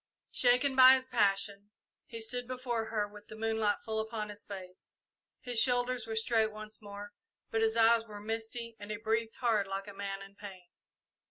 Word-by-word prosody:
Shaken 250 +2 +3
by 260 0 +10
his 260 -1 -2
passion, 205 -4 +1 0.4
he 230 -3 -7
stood 245 +2 -2
before 250 -3 -2
her 215 -2 -1
with 205 0 -14
the 215 - -9
moonlight 220 -1 0
full 220 0 -1
upon 220 -1 -3
his 210 0 -8
face. 185 -2 -10 0.5
His 245 -2 +1
shoulders 245 -2 +1
were 220 - -3
straight 220 -1 +2
once 215 0 -8
more, 205 0 -9 0.4
but 225 - +1
his 225 0 +2
eyes 230 0 +5
were 210 -1 -8
misty 225 +2 -4
and 205 0 -9
he 210 - -3
breathed 225 +1 -1
hard, 220 -5 +1
like 195 +1 -4
a 205 - -8
man 195 0 -5
in 195 0 -13
pain. 190 -3 -11
220 Hz, 185 wpm, -32 LUFS, 205-230 Hz, 0.5 s, by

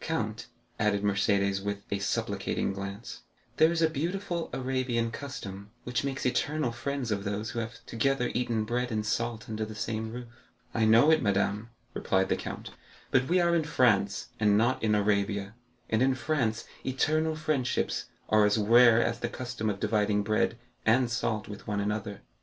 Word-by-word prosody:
"Count," - - -2 0.3
added 105 -1 +1
Mercédès 100 -1 +1
with 100 0 -3
a 100 - 0
supplicating 100 0 -1
glance, 100 +3 -7 0.4
"there 160 +1 +5
is 165 -1 +1
a - - +6
beautiful 170 +3 -3
Arabian 125 -3 -1
custom, 100 -8 -7
which 125 0 -1
makes 135 -1 -3
eternal 145 +1 0
friends 125 0 -3
of 100 -1 -1
those 105 +2 -3
who 115 - -3
have 115 0 -6
together 125 +1 0
eaten 120 -3 0
bread 125 +3 -1
and 110 -1 -1
salt 115 +1 -2
under 110 0 -3
the 110 0 -6
same 110 0 -3
roof." 125 +1 -6 0.5
"I 110 -1 +2
know 115 +8 +6
it, 155 -1 +4
madame," 105 +1 0 0.2
replied 95 0 +1
the - - +3
count; - - -6 0.4
"but 130 0 +3
we 180 +4 +3
are 170 -1 +3
in 165 -2 +3
France, 110 -9 +2
and 105 -1 +4
not 120 +4 +2
in 105 -1 +2
Arabia, 100 -1 0 0.3
and 110 +1 +1
in 130 0 +3
France 120 -4 -1 0.2
eternal 155 +4 +1
friendships 155 -5 -1 0.2
are 110 0 +4
as 105 - +2
rare 115 +2 +6
as 115 0 -1
the 120 - -2
custom 120 -3 -3
of 100 -1 -3
dividing 105 -1 +1
bread 110 +3 +1 0.3
and 120 +2 +3
salt 110 -2 -1
with 105 -1 -9
one 105 -1 -1
another." 105 -1 -3
115 Hz, 175 wpm, -29 LUFS, 105-130 Hz, 0.5 s, a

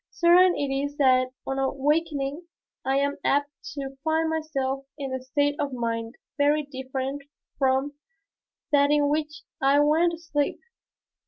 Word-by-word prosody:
Certain 350 +1 +5
it 280 -1 -1
is 285 +1 -2
that 255 -2 +4 0.2
on 270 0 -2
awakening 290 +3 -1 0.4
I 270 +1 +1
am 280 +1 0
apt 285 +1 +1 0.2
to 270 -1 -6
find 320 0 +1
myself 275 -4 -2
in 275 -3 -4
a 260 - -3
state 285 +3 +1
of 280 -2 -2
mind 230 0 -3 0.2
very 295 +1 +3
different 265 0 -5 0.4
from 265 +1 +1 0.8
that 285 -1 +4
in 295 -1 +3
which 300 0 -2 0.2
I 275 +2 +4
went 320 +4 +3
to - - -5
sleep. 295 -3 -2
285 Hz, 145 wpm, -26 LUFS, 270-300 Hz, 0.8 s, Certain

